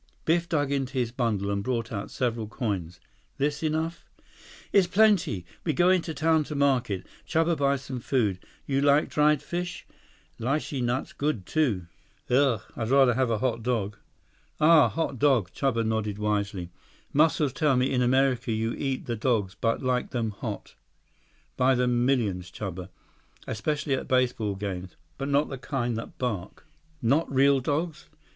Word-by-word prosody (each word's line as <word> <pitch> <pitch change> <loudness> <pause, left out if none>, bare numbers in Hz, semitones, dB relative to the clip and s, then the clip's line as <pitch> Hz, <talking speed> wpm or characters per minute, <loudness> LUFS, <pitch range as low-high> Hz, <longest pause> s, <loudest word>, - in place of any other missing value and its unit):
Biff 170 +1 +2
dug 145 -3 0
into 135 -1 -1
his 125 -3 0
bundle 110 -5 -1
and 100 0 -1
brought 115 -2 -2
out 100 -2 -4
several 115 -4 -2
coins. 95 -8 -3 0.4
"This 145 +1 -1
enough?" 160 +1 -2 0.7
106 - - -34
"Is 195 -3 +5
plenty. 180 - +3 0.2
We 160 - 0
go 175 +3 +4
into 170 -3 0
town 160 +2 +3
to 150 - -6
market. 130 -9 +1 0.2
Chuba 165 +1 +2
buy 140 -1 +2
some 130 -1 -6
food. 110 -7 0 0.3
You 135 -1 0
like 145 +1 +4
dried 150 -1 +3
fish? 175 +1 -4 0.5
Lichee 135 +2 -1
nuts 120 +2 -1
good, 140 -10 -2
too." 120 - 0 0.5
"Ugh. 130 -4 +3
I'd 110 -1 -3
rather 135 -2 +5
have 130 0 +1
a 115 - +1
hot 115 0 -1
dog." 110 -4 -1 0.6
"Ah, 155 -5 +6
hot 135 +1 -2
dog?" 130 -10 +3
Chuba 115 -5 0
nodded 110 -2 -1
wisely. 100 -4 -2 0.4
"Muscles 150 -2 +3
tell 145 -3 +2
me 130 +2 +2
in 125 -2 +1
America 130 -1 +2
you 115 +1 -1
eat 135 -2 -3
the 120 - -2
dogs 105 -4 0
but 115 +4 -1
like 125 -1 0
them 115 -3 -2
hot." 100 - -6 0.8
"By 130 +1 +4
the 125 0 +1
millions, 120 -8 +1
Chuba. 95 -1 -6 0.6
Especially 140 +5 -2
at 130 - -2
baseball 125 -5 +1
games. 95 -2 -5 0.2
But 135 +1 -2
not 140 +2 +2
the 135 - -6
kind 120 -3 -2
that 115 - -7
bark." 105 -8 -4 0.4
"Not 140 +8 +2
real 135 +1 +4
dogs?" 150 +5 -2
130 Hz, 160 wpm, -27 LUFS, 110-145 Hz, 0.8 s, Ah